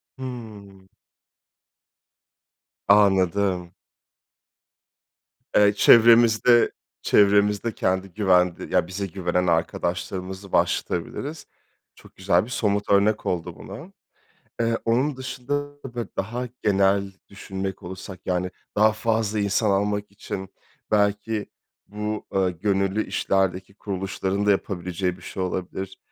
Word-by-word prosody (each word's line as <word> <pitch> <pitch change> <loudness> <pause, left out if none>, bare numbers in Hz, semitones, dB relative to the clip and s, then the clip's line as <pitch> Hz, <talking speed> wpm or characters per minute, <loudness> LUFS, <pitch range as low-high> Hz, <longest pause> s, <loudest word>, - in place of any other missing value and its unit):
Hımm. 105 -7 -9 2.0
Anladım. 95 -3 +3 1.8
Eee, 105 0 +5
çevremizde 115 +2 +6 0.3
çevremizde 105 +2 +3
kendi 95 0 -1
güvende 90 -3 +2
ya 85 - +3
bize 100 +2 -4
güvenen 90 0 -1
arkadaşlarımızı 90 +3 -2
başlatabiliriz. 140 - -1 0.5
Çok - - -18
güzel 95 0 +2
bir 120 - -12
somut 105 -4 -1
örnek 100 +2 +3
oldu 90 -1 -2
buna. 120 - -10 0.7
Eee, 115 0 +1
onun 130 +5 +1
dışında, 130 +1 -4 0.4
böyle, 120 -4 -4
daha 120 +5 -3
genel 100 -1 +2 0.2
düşünmek 95 -1 -6
olursak, 95 0 -8
yani, 90 0 -1 0.3
daha 110 +1 +5
fazla 110 -1 -1
insan 100 +1 +1
almak 105 +1 0
için 95 -1 -7 0.4
belki 105 +1 +1 0.4
bu, 105 +1 -4
eee, 95 -1 +2
gönüllü 100 +3 0
işlerdeki 95 0 -1
kuruluşların 95 0 -3
da - - +5
yapabileceği 90 -2 -1
bir - - -17
şey 95 - -5
olabilir, 95 +1 -4
100 Hz, 100 wpm, -24 LUFS, 95-110 Hz, 2.0 s, çevremizde